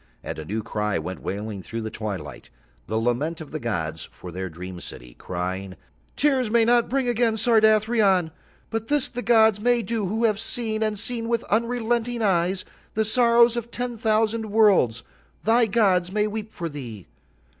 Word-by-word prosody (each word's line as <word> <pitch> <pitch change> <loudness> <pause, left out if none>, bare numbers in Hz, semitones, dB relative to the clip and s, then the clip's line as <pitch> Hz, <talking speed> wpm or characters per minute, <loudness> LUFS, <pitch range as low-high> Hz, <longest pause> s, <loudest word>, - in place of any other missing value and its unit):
And - - -5
a 80 - -6
new 110 +6 -3
cry 105 -1 -1
went 95 - -5
wailing 100 0 -4
through 115 +5 -5
the 110 - -4
Twilight, 95 - -6 0.4
the 110 - -1
lament 125 +8 -1
of 155 - -9
the 155 - -4
gods 80 - -3
for 90 - -10
Their 95 +2 -4
dream 90 +2 -8
city, - - -10
crying: 95 +5 -5 0.4
"Tears 270 -5 +2
may 230 0 +4
not 240 0 +3
bring 265 0 0
again 235 -1 +2
Sardathrion. 215 -5 +3 0.4
"But 225 0 -3
this 290 -2 +1
the 245 - -4
gods 220 -3 +4
may 240 +1 +2
do 225 -4 -2
who 220 +5 -1
have 215 -3 +2
seen, 225 -1 -3
and 215 -1 0
seen 230 +2 -2
with 235 -1 0
unrelenting 235 +1 0
eyes, 185 -1 +1 0.3
the 220 0 +2
sorrows 235 +1 +4
of 235 -1 -4
ten 245 0 -4
thousand 220 0 +1
worlds—thy 215 - +2
gods 190 -4 +2
may 210 +1 +1
weep 215 0 -4
for 170 -5 -4
thee. 120 - -8
215 Hz, 170 wpm, -24 LUFS, -, 0.4 s, may